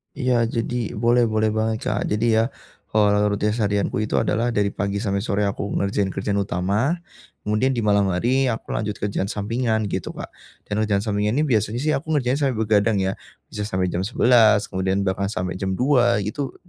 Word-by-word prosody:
Iya, 125 Hz, -4 st, +1 dB
jadi, 120 Hz, 0 st, -3 dB
boleh 120 Hz, +2 st, +3 dB
boleh 110 Hz, 0 st, +1 dB
banget 110 Hz, 0 st, -1 dB
Kak. 100 Hz, -, -1 dB
Jadi, 110 Hz, +1 st, +1 dB
ya -, -, +3 dB, 0.5 s
eee, 105 Hz, -1 st, +4 dB
rutinitas 105 Hz, +2 st, -1 dB
harianku 100 Hz, +1 st, 0 dB
itu 110 Hz, -, -1 dB
adalah 115 Hz, +3 st, +1 dB
dari 100 Hz, -1 st, +1 dB
pagi 100 Hz, 0 st, -2 dB
sampai 100 Hz, -1 st, 0 dB
sore 100 Hz, +1 st, -1 dB
aku 100 Hz, 0 st, -2 dB
ngerjain 100 Hz, 0 st, 0 dB
kerjaan 100 Hz, +1 st, -1 dB
utama, 100 Hz, -, 0 dB, 0.5 s
kemudian 110 Hz, +6 st, +1 dB
di 115 Hz, -, -1 dB
malam 100 Hz, -1 st, +3 dB
hari, 125 Hz, +9 st, +1 dB
aku 115 Hz, -3 st, -3 dB
lanjut 105 Hz, -1 st, -2 dB
kerjaan 100 Hz, -1 st, -2 dB
sampingan, 110 Hz, +2 st, -1 dB
gitu 95 Hz, -, -4 dB
Kak. -, -, -7 dB, 0.3 s
Dan, 105 Hz, +1 st, -3 dB
kerjaan 100 Hz, -2 st, 0 dB
sampingan 105 Hz, 0 st, 0 dB
ini 150 Hz, -, +2 dB
biasanya 115 Hz, -4 st, 0 dB
sih, 155 Hz, -, +2 dB
aku 150 Hz, +1 st, -2 dB
ngerjain 130 Hz, 0 st, +1 dB
sampai 135 Hz, -4 st, +1 dB
begadang 110 Hz, 0 st, +2 dB
ya. 95 Hz, 0 st, 0 dB, 0.4 s
Bisa 105 Hz, -1 st, -4 dB
sampai 95 Hz, -2 st, -1 dB
jam 90 Hz, -, -1 dB
11 110 Hz, -2 st, +4 dB
kemudian 95 Hz, +1 st, 0 dB
bahkan 100 Hz, +1 st, -1 dB
sampai 90 Hz, -2 st, -3 dB
jam 95 Hz, -1 st, -1 dB
2, 125 Hz, -1 st, +3 dB
gitu. 135 Hz, +7 st, -4 dB
105 Hz, 185 wpm, -22 LUFS, 100-120 Hz, 0.5 s, eee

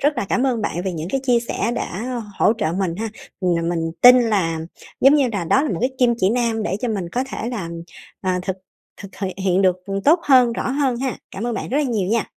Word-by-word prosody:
rất 290 Hz, +1 st, +1 dB
là 200 Hz, -, -2 dB
cảm 250 Hz, -, +1 dB
ơn 235 Hz, -4 st, 0 dB
bạn 175 Hz, -3 st, -2 dB
về 190 Hz, -, -2 dB
những 165 Hz, +1 st, -5 dB
cái 270 Hz, -, 0 dB
chia 240 Hz, -2 st, +3 dB
sẻ 235 Hz, 0 st, -2 dB
đã 240 Hz, +6 st, -4 dB, 0.2 s
hỗ 215 Hz, -, +4 dB
trợ 160 Hz, -5 st, 0 dB
mình 185 Hz, -2 st, -1 dB
ha! 225 Hz, +1 st, -3 dB, 0.3 s
Ừm, 170 Hz, -2 st, 0 dB
mình 165 Hz, -1 st, -2 dB
tin 250 Hz, 0 st, +9 dB
là 175 Hz, -8 st, 0 dB, 0.4 s
giống 275 Hz, +3 st, +6 dB
như 275 Hz, -4 st, +3 dB
đà 200 Hz, -6 st, -3 dB
đó 270 Hz, -, +3 dB
là 305 Hz, -, -1 dB
một -, -, -2 dB
cái 255 Hz, +2 st, +1 dB
kim 240 Hz, -2 st, +4 dB
chỉ 190 Hz, +2 st, +2 dB
nam 230 Hz, -2 st, 0 dB
để 190 Hz, -, -1 dB
cho 250 Hz, -, -1 dB
mình 195 Hz, -6 st, -3 dB
có 250 Hz, +8 st, -2 dB
thể 235 Hz, -, -4 dB
là, 205 Hz, -9 st, -4 dB, 0.5 s
ờ, 185 Hz, -, -1 dB
thực 190 Hz, 0 st, -3 dB, 0.5 s
thực 200 Hz, -, -8 dB
th 200 Hz, -, -5 dB, 0.2 s
hiện 190 Hz, +1 st, +2 dB
được 185 Hz, -1 st, +3 dB, 0.3 s
tốt 330 Hz, +4 st, +5 dB
hơn, 250 Hz, -4 st, +5 dB
rõ 230 Hz, -, -3 dB
hơn 270 Hz, -3 st, 0 dB
ha! 260 Hz, -2 st, -2 dB
Cảm 225 Hz, +5 st, -5 dB
ơn 240 Hz, -, -2 dB
bạn -, -, -4 dB
rất 265 Hz, -, -1 dB
là 300 Hz, -, +1 dB
nhiều 215 Hz, -7 st, -1 dB
nha! 225 Hz, -1 st, +1 dB
225 Hz, 255 wpm, -21 LUFS, 185-250 Hz, 0.5 s, tin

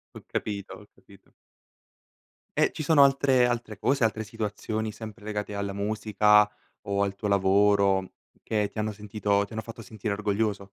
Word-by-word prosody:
Ho -, -, -9 dB
capito, 100 Hz, -2 st, -4 dB
ho -, -, -13 dB
capito. -, -, -21 dB, 1.3 s
E -, -, +4 dB
ci -, -, -6 dB
sono 145 Hz, -1 st, +5 dB
altre 135 Hz, -2 st, +4 dB
altre 120 Hz, -3 st, -2 dB
cose, 135 Hz, -2 st, +1 dB
altre 110 Hz, 0 st, +1 dB
situazioni 110 Hz, +1 st, -4 dB
sempre 110 Hz, 0 st, -10 dB
legate 105 Hz, -1 st, -4 dB
alla 100 Hz, -1 st, -3 dB
musica 105 Hz, 0 st, +3 dB, 0.4 s
o 100 Hz, 0 st, +1 dB
al 100 Hz, -1 st, -1 dB
tuo 105 Hz, +1 st, -4 dB
lavoro, 100 Hz, -1 st, +3 dB, 0.3 s
che 105 Hz, -2 st, 0 dB
ti 110 Hz, -, -6 dB
hanno 110 Hz, 0 st, -1 dB
sentito 100 Hz, -1 st, -1 dB
ti 110 Hz, -, -14 dB
hanno 110 Hz, -, -3 dB
fatto 115 Hz, 0 st, -10 dB
sentire 105 Hz, 0 st, -4 dB
orgoglioso? 105 Hz, -1 st, -1 dB
105 Hz, 160 wpm, -27 LUFS, 100-110 Hz, 1.3 s, sono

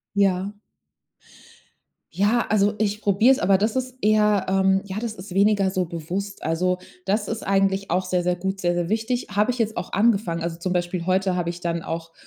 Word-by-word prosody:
Ja. 195 Hz, -1 st, +2 dB, 1.6 s
Ja, 210 Hz, +5 st, +2 dB
also, 205 Hz, 0 st, +2 dB
ich 210 Hz, 0 st, -1 dB
probiere 210 Hz, +6 st, +4 dB
es, 265 Hz, -, +1 dB
aber 190 Hz, +1 st, +3 dB
das 215 Hz, +4 st, 0 dB
ist 255 Hz, 0 st, -3 dB
eher, 210 Hz, -2 st, +3 dB
ähm 190 Hz, 0 st, +3 dB
ja, 200 Hz, +1 st, -5 dB
das 230 Hz, -1 st, -3 dB
ist 185 Hz, -2 st, -10 dB
weniger 200 Hz, -1 st, +3 dB
so 185 Hz, -1 st, 0 dB
bewusst. 175 Hz, +5 st, -5 dB
Also, 180 Hz, +3 st, 0 dB, 0.3 s
das 205 Hz, +2 st, 0 dB
ist 225 Hz, 0 st, -4 dB
eigentlich 195 Hz, 0 st, +1 dB
auch 185 Hz, -, +1 dB
sehr, 180 Hz, -1 st, 0 dB
sehr 180 Hz, 0 st, +1 dB
gut, 190 Hz, +2 st, -3 dB
sehr, 175 Hz, 0 st, +1 dB
sehr 175 Hz, -1 st, -1 dB
wichtig. 225 Hz, +4 st, -1 dB
Habe 210 Hz, +3 st, +2 dB
ich 250 Hz, -, -3 dB
jetzt 220 Hz, -2 st, -1 dB
auch 175 Hz, -, -5 dB
angefangen. 200 Hz, -5 st, +1 dB
Also, 165 Hz, 0 st, -4 dB
zum 180 Hz, +1 st, -2 dB
Beispiel 175 Hz, -1 st, -2 dB
heute 185 Hz, 0 st, +1 dB
habe 170 Hz, -1 st, -1 dB
ich 175 Hz, 0 st, -7 dB
dann 170 Hz, -1 st, -2 dB
auch, 165 Hz, 0 st, -5 dB
195 Hz, 200 wpm, -23 LUFS, 180-210 Hz, 1.6 s, probiere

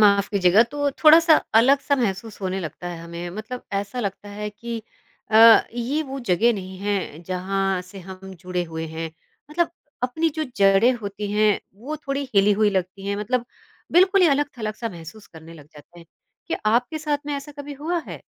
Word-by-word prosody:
माफ़ 200 Hz, -1 st, +5 dB
कीजिएगा, 195 Hz, +1 st, +5 dB
तो 285 Hz, +4 st, -2 dB
थोड़ा-सा 320 Hz, +3 st, +6 dB, 0.2 s
अलग 265 Hz, +5 st, +5 dB
सा 285 Hz, -, +1 dB
महसूस 215 Hz, -3 st, -3 dB
होने 190 Hz, 0 st, -2 dB
लगता 170 Hz, +1 st, -6 dB
है 170 Hz, -1 st, -6 dB
हमें। 170 Hz, +1 st, -7 dB
मतलब 220 Hz, +6 st, -7 dB
ऐसा 200 Hz, +5 st, -3 dB
लगता 205 Hz, -1 st, -5 dB
है 210 Hz, +1 st, -5 dB
कि 230 Hz, +2 st, -6 dB, 0.5 s
अ, 225 Hz, +1 st, +8 dB
ये 250 Hz, +6 st, -1 dB
वो 275 Hz, -2 st, -6 dB
जगह 230 Hz, +1 st, +2 dB
नहीं 190 Hz, -3 st, -7 dB
है 195 Hz, -5 st, -3 dB
जहाँ 190 Hz, +1 st, -1 dB
से 185 Hz, +2 st, -12 dB
हम 190 Hz, +1 st, -10 dB
जुड़े 180 Hz, -1 st, -2 dB
हुए 160 Hz, -1 st, -5 dB
हैं। 160 Hz, +1 st, -5 dB, 0.4 s
मतलब 340 Hz, +2 st, 0 dB, 0.3 s
अपनी 315 Hz, +7 st, +1 dB
जो 310 Hz, +1 st, -3 dB
जड़ें 195 Hz, +4 st, +5 dB
होती 205 Hz, -3 st, -5 dB
हैं 210 Hz, -1 st, +3 dB, 0.2 s
वो 295 Hz, +6 st, -5 dB
थोड़ी 275 Hz, 0 st, -1 dB
हिली 200 Hz, +1 st, +5 dB
हुई 210 Hz, -1 st, +4 dB
लगती 190 Hz, 0 st, -3 dB
हैं 200 Hz, 0 st, -1 dB
मतलब 235 Hz, +4 st, -1 dB, 0.5 s
बिल्कुल 375 Hz, +3 st, +5 dB
ही -, -, +7 dB
अलग-थलग 275 Hz, -7 st, -1 dB
सा 230 Hz, +1 st, -4 dB
महसूस 175 Hz, +3 st, -11 dB
करने 165 Hz, 0 st, -13 dB
लग 150 Hz, -3 st, -14 dB
जाते 150 Hz, +3 st, -16 dB
हैं। 170 Hz, -, -15 dB, 0.4 s
क्या -, -, -2 dB
आपके 245 Hz, +7 st, +1 dB
साथ 300 Hz, -1 st, -1 dB
में 290 Hz, -, -2 dB
ऐसा 280 Hz, +1 st, -7 dB
कभी 285 Hz, 0 st, -8 dB
हुआ 315 Hz, +5 st, -2 dB
है? -, -, -7 dB
210 Hz, 190 wpm, -23 LUFS, 190-265 Hz, 0.5 s, अ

